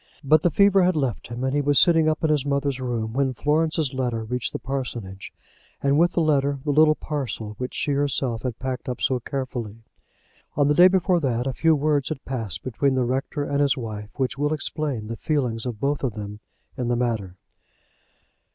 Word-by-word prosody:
But 155 +2 +4
the 175 - +3
fever 200 +3 +4
had 180 -1 +3
left 135 -7 -2
him, 120 +2 -5
and 130 0 0
he 145 - +2
was 145 0 +2
sitting 165 -3 +5
up 155 +1 -2
in 160 - +3
his 150 -3 +2
mother's 140 -1 -1
room, 115 -3 -2
when 130 0 0
Florence's 155 0 0
letter 120 -4 -2
reached 125 +2 -3
the - - -3
parsonage, 120 -8 -5 0.5
and, 140 +1 +3
with 175 +1 +3
the 170 - +1
letter, 140 -3 +2
the 145 - +1
little 155 +1 +5
parcel 130 -9 -4
which 125 0 -4
she 145 - 0
herself 135 -5 0
had 125 -3 -4
packed 130 0 -4
up 125 - -4
so 130 -1 +1
carefully. 120 -4 -5 0.7
On 145 -1 +4
the 150 - +4
day 175 +4 +8
before 185 -1 +2
that 125 -5 -1
a 135 - -1
few 160 +4 +3
words 145 -2 +1
had 155 -4 -6
passed 110 -8 -3
between 130 +2 0
the 130 -1 +1
rector 135 +4 -2
and 140 0 -1
his 140 -2 +2
wife, 105 -4 -6
which 135 -1 -2
will 145 +1 +1
explain 145 -6 -3
the 115 +2 -5
feelings 125 -6 -1
of 115 -4 -5
both 140 +3 -1
of 120 -5 -1
them 105 0 -7 0.4
in 125 - -3
the 120 - +1
matter. 110 -7 -2
135 Hz, 205 wpm, -24 LUFS, 120-150 Hz, 0.7 s, day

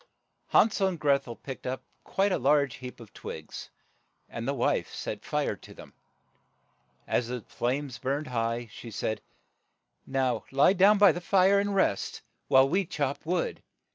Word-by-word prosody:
Han 225 - +5
sel 195 -1 +1
and 180 -4 -3
Greth 140 -3 +2
el 120 - -6
picked 135 +1 -8
up 130 +1 -3 0.2
quite 195 +1 +1
a - - +1
large 140 0 +2
heap 125 -1 -9
of 115 -3 -13
twigs, 80 -1 -8 0.6
and 115 +1 -6
the 140 - +1
wife 120 - 0
set - - -5
fire - - -1
to - - -15
them. - - -13 1.1
As 120 - 0
the 125 0 -4
flames 125 +1 -3
burned 140 +3 -1
high, 120 -2 -2
she 115 - -9
said, 110 0 -3 0.9
"Now 130 -4 0
lie 140 +7 +5
down 200 +2 +6
by 200 -2 +7
the 175 - -5
fire 195 +2 +4
and 200 0 -1
rest, 100 - 0 0.2
while 130 0 +6
we 190 +7 +1
chop 145 -3 -3
wood. 175 0 -1
140 Hz, 170 wpm, -28 LUFS, 120-180 Hz, 1.1 s, by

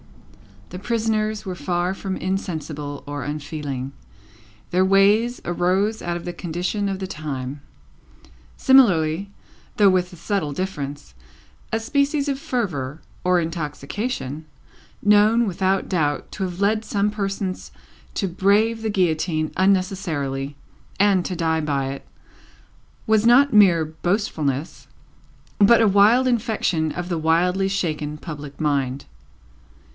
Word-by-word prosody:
The 180 - -7
prisoners 215 -1 -1
were 185 - -3
far 175 +2 -1
from 195 -1 -4
insensible 155 -6 -4
or 145 -2 -5
unfeeling; 145 -2 -5 0.8
their 185 +1 +3
ways 205 +5 +3
arose 185 +5 0
out 175 0 -2
of 170 - -9
the 175 - -4
condition 180 +5 -2
of 195 - -2
the 190 - -4
time. 145 -5 -5 1.0
Similarly, 195 - +4 0.5
though 205 -2 +6
with 180 -1 +1
a - - -9
subtle 170 -4 -2
difference, 145 - -5 0.6
a 225 - +2
species 280 +4 0
of 270 -1 -2
fervour 160 - -3 0.2
or 180 -1 +3
intoxication, 160 - -4 0.6
known, 210 +3 +5
without 190 0 0
doubt, 150 -6 -1
to 195 - -4
have 180 0 -4
led 215 +2 +2
some 205 -1 0
persons 195 -2 -3 0.4
to 195 - 0
brave 205 +5 +2
the 220 - -2
guillotine 165 -5 0
unnecessarily, 180 -8 0 0.5
and 195 -3 +3
to 185 - -3
die 160 -1 0
by 140 -3 -1
it, 140 - -9 1.0
was 220 0 +3
not 275 +3 +6
mere 180 -6 +6
boastfulness, 160 - -2 0.7
but 230 +3 +6
a 225 - +5
wild 210 +6 +5
infection 215 -10 0
of 180 0 -5
the 170 -2 -1
wildly 180 +4 +2
shaken 155 -6 -2
public 150 -3 -8
mind. 140 -3 -1
185 Hz, 125 wpm, -22 LUFS, 155-205 Hz, 1.0 s, though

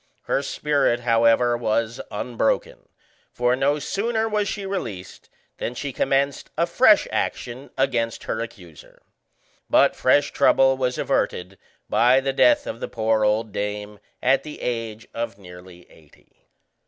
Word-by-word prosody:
Her - - 0
spirit, 140 -4 0
however, 115 0 +3
was 115 0 -1
unbroken, 110 +1 -2 0.4
for 125 +1 +1
no 140 +3 +1
sooner 220 +8 -1
was 210 -2 0
she 200 -1 -4
released 110 - -6 0.3
than 120 - -4
she 140 +1 -5
commenced 135 +1 0
a - - +3
fresh - - +4
action 125 +3 -3
against 120 -4 0
her 110 - -3
accuser. 90 -9 -11 0.7
But - - +4
fresh 145 +3 +2
trouble 135 -1 +4
was 125 -1 -1
averted 90 +1 -2 0.3
by 125 +3 +4
the 135 0 -2
death 295 - +4
of 280 - -6
the - - -4
poor 110 -1 0
old 105 +1 +1
dame 105 +1 -4 0.2
at 130 +2 +3
the 150 -1 -9
age 115 -2 -4
of 115 -3 -4
nearly 90 -2 -14
eighty. 75 -3 -24
120 Hz, 140 wpm, -23 LUFS, 110-135 Hz, 0.7 s, fresh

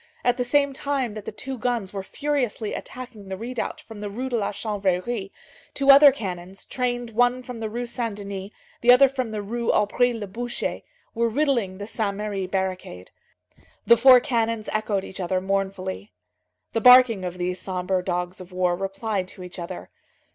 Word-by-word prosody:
At 245 - +3
the 250 - +1
same 280 +2 +2
time 270 -5 -2
that 215 -1 -8
the - - -4
two 265 -1 -6
guns 230 -5 -1
were 195 - -3
furiously 245 -2 -2
attacking 245 -6 -8
the 190 - -4
redoubt 240 +3 -4
from 220 -2 -11
the 205 - -4
Rue 250 +6 -4
de 245 - -1
la 210 -3 0
Chanvrerie, 200 0 -2 0.5
two 275 0 +6
other 280 +1 +9
cannons, 190 -6 -7
trained 245 -2 -2
one 245 +3 +2
from 250 -2 -8
the 220 -1 -3
Rue 240 +3 -3
Saint 235 -2 -3
Denis, 200 -1 -6 0.3
the 240 - +7
other 260 +2 +8
from 260 -3 -3
the 215 -1 -4
Rue 235 +3 -1
Aubry 245 +4 +2
le 225 -3 -4
Boucher, 240 +5 -4 0.3
were 235 0 +1
riddling 235 -7 0
the 205 - -6
Saint 205 -2 -2
Merry 205 -3 -3
barricade. 185 - -4 0.7
The 235 - +7
four 250 +2 +8
cannons 230 -4 -1
echoed 215 -2 0
each 190 - -9
other 185 0 0
mournfully. 190 - -3 0.6
The 225 - 0
barking 250 -5 +7
of 180 0 -4
these 180 +1 -3
sombre 185 0 -1
dogs 180 0 -3
of 180 0 -12
war 180 -1 +1
replied 195 +1 -3
to 185 - -9
each 180 +1 -9
other. 95 - -7
215 Hz, 185 wpm, -24 LUFS, 190-245 Hz, 0.7 s, other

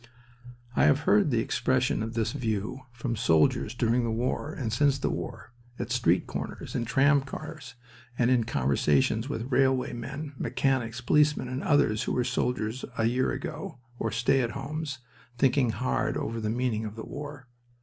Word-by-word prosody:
I - - +4
have 145 +1 +4
heard 195 +1 +4
the 120 - +1
expression 130 0 +1
of 115 +1 -4
this 115 -2 0
view 115 0 -3
from 120 0 -3
soldiers 105 +1 +2
during 120 0 +2
the 115 - -1
war 125 +6 -1
and 115 -7 -3
since 140 +2 +3
the - - -1
war, 110 +3 -6 0.2
at 120 -1 -4
street 120 0 +2
corners, - - -6
in 120 - -1
tram 140 +3 +4
cars, 140 0 -8 0.4
and 125 0 +3
in 120 -3 +3
conversations 75 - +1
with 125 -1 -4
railway 130 0 +2
men, 140 +5 -6
mechanics, 125 -2 0
policemen, 150 0 +3
and 130 +2 -3
others 130 -7 +3
who - - -1
were 125 - +1
soldiers 125 -1 -1
a 110 - +2
year 125 +3 +2
ago, - - -5 0.2
or - - 0
stay 130 +3 +2
at 120 -1 -2
homes, 145 +1 -4 0.4
thinking 130 -1 +3
hard 125 +3 -1
over 115 0 -3
the 105 - -1
meaning 115 -1 0
of 105 -1 -6
the 110 - -7
war. 145 -2 -8
125 Hz, 170 wpm, -28 LUFS, 115-135 Hz, 0.4 s, I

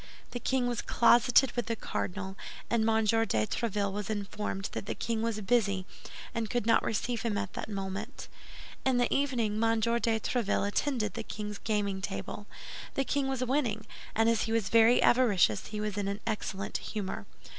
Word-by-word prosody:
The 245 - -4
king 260 +1 +1
was 240 -1 -1
closeted 245 +3 +5
with 240 - -2
the 230 - 0
cardinal, 190 -2 -4 0.4
and 225 -1 +3
M. 220 0 +3
de 220 - +2
Tréville 205 - -1
was 205 +2 -4
informed 205 -1 -3
that - - -5
the - - -2
king 230 -2 -2
was 225 -1 -1
busy 200 -3 +1 0.5
and 230 -2 -2
could 240 -3 -1
not 230 - +5
receive 235 +2 -1
him 220 -3 -1
at 190 - -3
that - - -5
moment. 200 +4 -5 0.6
In 260 -2 +2
the 245 -1 +2
evening 235 -6 +1
M. 225 0 +3
de 235 +2 +2 0.2
Tréville 220 -3 0
attended 215 -2 0
the - - -4
king's 210 -1 -6
gaming 205 -3 -1
table. 200 +1 -5 0.5
The 275 - +2
king 280 0 0
was 265 -1 -1
winning; 250 -5 0 0.3
and 225 +1 +3
as 230 -2 +2
he 225 - -3
was 225 -3 +1
very 230 +1 +6
avaricious, 205 - +4
he 210 - -5
was 210 -2 -2
in 200 - -1
an 200 +1 -2
excellent 195 -3 -2
humor. 205 -3 -5
220 Hz, 180 wpm, -30 LUFS, 205-235 Hz, 0.6 s, very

